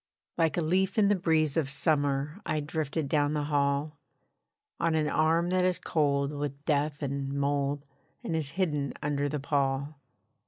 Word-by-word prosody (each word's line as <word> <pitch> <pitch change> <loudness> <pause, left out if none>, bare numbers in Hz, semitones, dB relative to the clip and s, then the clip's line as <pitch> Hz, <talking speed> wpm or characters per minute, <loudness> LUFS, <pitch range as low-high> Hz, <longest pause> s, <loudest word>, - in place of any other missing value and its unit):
Like 165 -2 +1
a 170 - +1
leaf 190 +5 +1
in 205 -2 +5
the 205 - +4
breeze 160 -5 +1
of 155 -5 +1
summer 145 +2 0
I 155 - -1
drifted 150 0 -2
down 145 +1 +1
the 150 -1 0
hall, 145 0 0 0.8
On 165 -1 +1
an 155 -1 +1
arm 165 +3 +2
that 185 0 +2
is 180 -1 +2
cold 140 -2 +1
with 145 -1 -5
death 150 -1 0
and 140 0 -2
mould, 140 0 -1 0.4
And 165 - -2
is 155 -3 -1
hidden 150 -7 0
under 145 -1 0
the 150 +1 -2
pall. 140 0 -1
145 Hz, 165 wpm, -29 LUFS, 140-160 Hz, 0.8 s, in